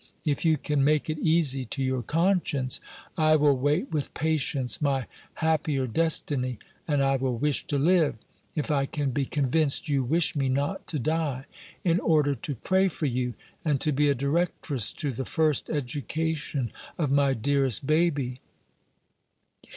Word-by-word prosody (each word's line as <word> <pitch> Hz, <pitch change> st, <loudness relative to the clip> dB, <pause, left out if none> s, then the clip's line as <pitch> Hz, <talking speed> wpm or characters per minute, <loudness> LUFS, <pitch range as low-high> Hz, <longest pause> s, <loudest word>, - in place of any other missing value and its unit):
If 145 Hz, -2 st, 0 dB
you 160 Hz, -2 st, +3 dB
can 145 Hz, -2 st, 0 dB
make 150 Hz, +2 st, +2 dB
it 155 Hz, -, -5 dB
easy 155 Hz, -5 st, +2 dB
to 135 Hz, +4 st, -3 dB
your 130 Hz, -1 st, 0 dB
conscience, 155 Hz, -, +1 dB, 0.4 s
I 155 Hz, 0 st, +5 dB
will 145 Hz, -2 st, +4 dB
wait 145 Hz, -, 0 dB
with 150 Hz, -3 st, -3 dB
patience 145 Hz, -4 st, 0 dB
my 135 Hz, -4 st, +1 dB, 0.3 s
happier 155 Hz, -4 st, 0 dB
destiny; 130 Hz, -2 st, -1 dB, 0.3 s
and 145 Hz, -3 st, +2 dB
I 135 Hz, 0 st, +2 dB
will 130 Hz, -2 st, -1 dB
wish 145 Hz, +3 st, -1 dB
to 145 Hz, -, 0 dB
live 160 Hz, +1 st, +3 dB, 0.4 s
(if 155 Hz, +1 st, -1 dB
I 140 Hz, -2 st, +1 dB
can 145 Hz, -2 st, -2 dB
be 135 Hz, +2 st, -1 dB
convinced 150 Hz, +3 st, +1 dB
you 140 Hz, -2 st, +2 dB
wish 160 Hz, +7 st, +1 dB
me 135 Hz, -2 st, 0 dB
not 145 Hz, +9 st, -1 dB
to 155 Hz, -, -3 dB
die) 145 Hz, -2 st, -1 dB, 0.4 s
in 175 Hz, -2 st, +2 dB
order 150 Hz, -3 st, +2 dB
to 140 Hz, +2 st, -3 dB
pray 190 Hz, -, +2 dB
for 160 Hz, -3 st, -3 dB
you, 125 Hz, -2 st, -1 dB, 0.3 s
and 150 Hz, -4 st, +1 dB
to 155 Hz, -, +2 dB
be 145 Hz, +1 st, +2 dB
a 140 Hz, -, +2 dB
directress 140 Hz, -, +1 dB
to 145 Hz, -4 st, -2 dB
the 130 Hz, +2 st, -4 dB
first 155 Hz, +1 st, +1 dB
education 150 Hz, -1 st, -2 dB, 0.3 s
of 150 Hz, -5 st, 0 dB
my 140 Hz, -1 st, +3 dB
dearest 135 Hz, 0 st, +1 dB
baby. 145 Hz, -5 st, +1 dB
145 Hz, 160 wpm, -27 LUFS, 135-155 Hz, 0.4 s, I